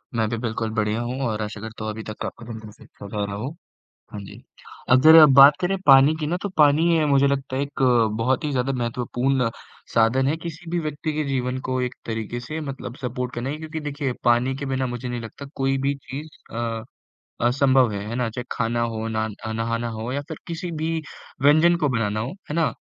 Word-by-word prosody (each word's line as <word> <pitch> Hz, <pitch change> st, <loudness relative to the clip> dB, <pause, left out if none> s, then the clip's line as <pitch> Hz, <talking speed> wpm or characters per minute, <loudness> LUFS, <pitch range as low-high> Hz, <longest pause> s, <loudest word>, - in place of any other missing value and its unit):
मैं 110 Hz, -1 st, +1 dB
भी 115 Hz, -, -2 dB
बिल्कुल 115 Hz, -1 st, -2 dB
बढ़िया 110 Hz, +1 st, 0 dB
हूँ 125 Hz, +2 st, -3 dB
और 110 Hz, -1 st, -2 dB
आशा 105 Hz, 0 st, -5 dB
करता 110 Hz, 0 st, -7 dB
हूँ 110 Hz, -, -2 dB
अभी 110 Hz, +1 st, -7 dB
तक 110 Hz, 0 st, -6 dB
आपका 120 Hz, -, -7 dB
दिन 115 Hz, -1 st, -7 dB
भी 110 Hz, -1 st, -11 dB
स 105 Hz, -, -21 dB
अच्छा 100 Hz, -, -12 dB
जा 105 Hz, +1 st, -3 dB
रहा 100 Hz, 0 st, -5 dB
हो, 115 Hz, +6 st, -4 dB, 0.6 s
हाँ 105 Hz, -, -6 dB
जी। 100 Hz, -, -11 dB, 0.5 s
अब 130 Hz, 0 st, +7 dB
ज़रा 160 Hz, 0 st, +10 dB
बात 140 Hz, +2 st, +10 dB
करें 190 Hz, +2 st, +1 dB
पानी 135 Hz, +2 st, +7 dB
की 150 Hz, -, -1 dB
ना, 170 Hz, -, 0 dB
तो 200 Hz, -, -2 dB
पानी 150 Hz, +3 st, +5 dB
ये 160 Hz, -, +2 dB
मुझे 140 Hz, -1 st, +4 dB
लगता 135 Hz, -1 st, -1 dB
है 135 Hz, -, 0 dB
एक 140 Hz, -1 st, -4 dB, 0.4 s
बहुत 130 Hz, +6 st, +1 dB
ही 150 Hz, -, 0 dB
ज़्यादा 130 Hz, 0 st, 0 dB
महत्वपूर्ण 125 Hz, +1 st, 0 dB, 0.4 s
साधन 115 Hz, +4 st, +3 dB
है 155 Hz, -, +1 dB
किसी 165 Hz, +1 st, -8 dB
भी 175 Hz, -, 0 dB
व्यक्ति 155 Hz, 0 st, -3 dB
के 155 Hz, 0 st, -1 dB
जीवन 130 Hz, -1 st, -1 dB
को 130 Hz, 0 st, 0 dB
एक 125 Hz, 0 st, -2 dB
तरीके 115 Hz, +1 st, -4 dB
से 155 Hz, +7 st, -5 dB
मतलब 135 Hz, -4 st, -6 dB
सपोर्ट 125 Hz, 0 st, -3 dB
करना 120 Hz, +3 st, -3 dB
है 150 Hz, -, -3 dB
क्योंकि 160 Hz, 0 st, -6 dB
देखिए 145 Hz, -3 st, -3 dB
पानी 120 Hz, +2 st, +3 dB
के 140 Hz, +1 st, -5 dB
बिना 130 Hz, -1 st, -1 dB
मुझे 120 Hz, +1 st, -5 dB
नहीं 120 Hz, -1 st, -3 dB
लगता 115 Hz, +5 st, -9 dB
कोई 135 Hz, 0 st, 0 dB
भी 140 Hz, +1 st, +1 dB
चीज़ 140 Hz, +2 st, -8 dB, 0.3 s
अ, 115 Hz, -1 st, -3 dB, 0.6 s
असंभव 130 Hz, -1 st, +3 dB
है, 100 Hz, 0 st, -4 dB
है 115 Hz, -, -4 dB
ना? 125 Hz, -2 st, 0 dB
चाहे 120 Hz, +2 st, -6 dB
खाना 115 Hz, +1 st, 0 dB
हो, 115 Hz, -1 st, -2 dB
न 110 Hz, -1 st, -2 dB, 0.2 s
नहाना 115 Hz, +1 st, -1 dB
हो 115 Hz, +2 st, -5 dB
या 140 Hz, -, -1 dB
फिर 160 Hz, -, -6 dB
किसी 170 Hz, +1 st, -4 dB
भी 160 Hz, 0 st, -2 dB, 0.4 s
व्यंजन 155 Hz, +5 st, +5 dB
को 145 Hz, -, +3 dB
बनाना 110 Hz, -4 st, 0 dB
हो, 115 Hz, +4 st, -3 dB, 0.2 s
है 150 Hz, -, -3 dB
ना? 165 Hz, -1 st, +1 dB
125 Hz, 225 wpm, -23 LUFS, 115-145 Hz, 0.6 s, ज़रा